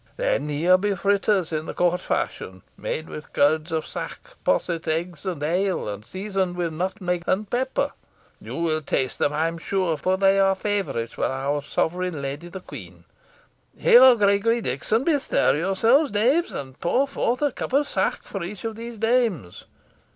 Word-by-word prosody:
Then 150 +2 0
here 170 +5 +3
be 205 +1 0
fritters 200 -2 +1
in 155 0 -2
the - - -6
court 180 0 +1
fashion, 95 -1 -3
made 160 - -4
with 150 - -9
curds 155 +3 +2
of 160 -1 -1
sack - - -6 0.2
posset, 170 -2 0
eggs 170 +4 -2
and 165 -6 -3
ale, 180 - 0
and 105 0 -5
seasoned 190 - -2
with 170 -2 -2
nutmeg 180 0 -2
and 205 +3 0
pepper. 255 +5 -1 0.5
You - - -7
will 160 -2 0
taste 130 -3 -2
them, 145 - +2
I 155 +2 +1
am 165 0 -5
sure, 180 -3 -1
for 185 +4 0
they 195 0 +4
are 195 0 +4
favourites 190 - -2
with - - 0
our 140 +2 -1
sovereign 175 +3 -2
lady, 140 +4 -5
the 185 +2 -8
queen. 90 - -11 0.8
Here, 255 +1 +8
Gregory, 210 +2 +2
Dickon 215 - 0
bestir 290 - +2
yourselves, 225 - +3
knaves, 255 - +2
and 130 -1 -7
pour 255 +11 +1
forth 255 -1 -1
a 290 - +2
cup - - -5
of 285 +3 +3
sack - - -1
for 195 - -6
each 190 +3 -7
of 225 -1 -3
these 230 +1 -8
dames. 225 - 0
185 Hz, 175 wpm, -24 LUFS, 155-210 Hz, 0.8 s, Here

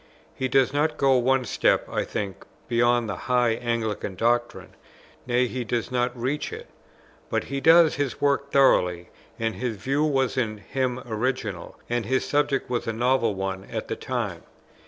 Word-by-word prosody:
He 130 - -2
does 130 0 +3
not 150 +1 +1
go 135 -1 +4
one 130 +1 +2
step, - - +1
I - - -1
think, 100 -3 -5 0.2
beyond 120 0 +2
the 100 - -3
high 125 -2 +3
Anglican 110 -4 -2
doctrine, 120 +3 0 0.5
nay 125 0 +2
he 125 +1 -3
does 120 +1 -2
not 125 0 -1
reach 135 +5 -2
it; - - -7 0.6
but - - 0
he 140 0 -4
does 165 +2 +6
his 145 -3 -2
work 140 0 +1
thoroughly, 90 -10 +3 0.3
and 115 -1 -1
his 120 -4 -3
view 135 +9 0
was 135 -4 +1
in 110 -4 -1
him 125 +4 -2
original, 110 -4 -3
and 120 -3 -2
his 130 +2 +1
subject 145 -2 0
was 120 -2 -2
a 115 - -1
novel 120 -2 +1
one 95 0 -4
at - - -5
the - - -1
time. - - -3
125 Hz, 170 wpm, -25 LUFS, 115-135 Hz, 0.6 s, does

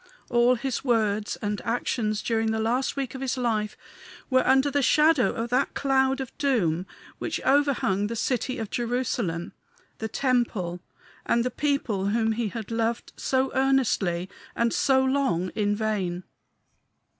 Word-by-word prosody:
All 240 +1 +4
his 245 +1 -3
words 215 -4 +1
and 205 0 -2
actions 220 -2 -1
during 225 -1 0
the 220 0 0
last 245 +4 0
week 270 -3 -3
of 265 - -7
his 265 0 -1
life 220 -4 -1 0.5
were 260 0 +5
under 265 +2 +4
the 285 +1 +1
shadow 300 +1 +4
of 230 +1 -3
that 255 +3 +1
cloud 270 -1 +2
of 265 -2 -6
doom 190 - +1 0.3
which - - -2
overhung 265 -8 +2
the 230 - -4
city 255 +2 -1
of 220 -2 -5
Jerusalem, 235 -8 -2 0.5
the 220 - -2
temple, 225 -8 0 0.4
and 235 0 +1
the 250 - -1
people 245 -8 -1
whom 225 +2 +1
he 225 0 -1
had 220 +1 -6
loved, 230 +1 -1
so 265 0 0
earnestly 250 -10 +1 0.3
and 235 -1 +1
so 265 -1 +3
long, 260 -10 +1
in 205 0 0
vain. 195 -5 -2
235 Hz, 150 wpm, -26 LUFS, 210-265 Hz, 0.5 s, were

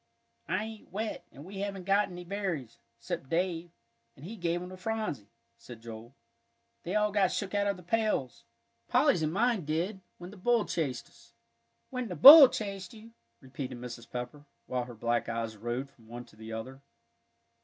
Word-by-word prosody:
"I 185 +3 0
ain't 220 -1 -9
wet, 215 +2 -4
and 140 +5 -12
we 195 +1 -8
haven't 200 -1 -4
got 200 +2 +2
any 180 0 -8
berries, 175 - -4 0.2
'cept 170 -7 -5
Dave, 170 0 -1 0.5
an' 135 - -14
he 205 +8 -7
gave 175 -3 -1
'em 180 +1 -7
to 185 - -9
Phronsie," 185 - -3 0.3
said 120 -2 -11
Joel. 115 +2 -10 0.7
"They 180 +4 -4
all 210 0 +2
got 195 -2 +2
shook 200 -1 -3
out 205 0 +1
of 200 -2 0
the 180 - -13
pails, 210 - -1 0.4
Polly's 175 - +3
and 155 -1 0
mine 225 +1 +1
did, 170 +7 -2 0.2
when 175 +1 -9
the 205 - -13
bull 235 +3 +2
chased 140 -7 -2
us." - - -22 0.6
"When 255 -2 -3
the 180 - -5
bull 280 - +12
chased 195 -3 -5
you!" 225 +1 -13 0.3
repeated 130 -1 -6
Mrs. 120 -1 -9
Pepper, 125 +4 -6 0.2
while 125 -1 -2
her 120 -1 -10
black 120 +2 -1
eyes 115 -1 -3
roved 120 +5 -4
from 115 -2 -22
one 120 +1 -8
to - - -20
the 110 +1 -10
other. 130 +5 -7
175 Hz, 185 wpm, -30 LUFS, 125-205 Hz, 0.7 s, bull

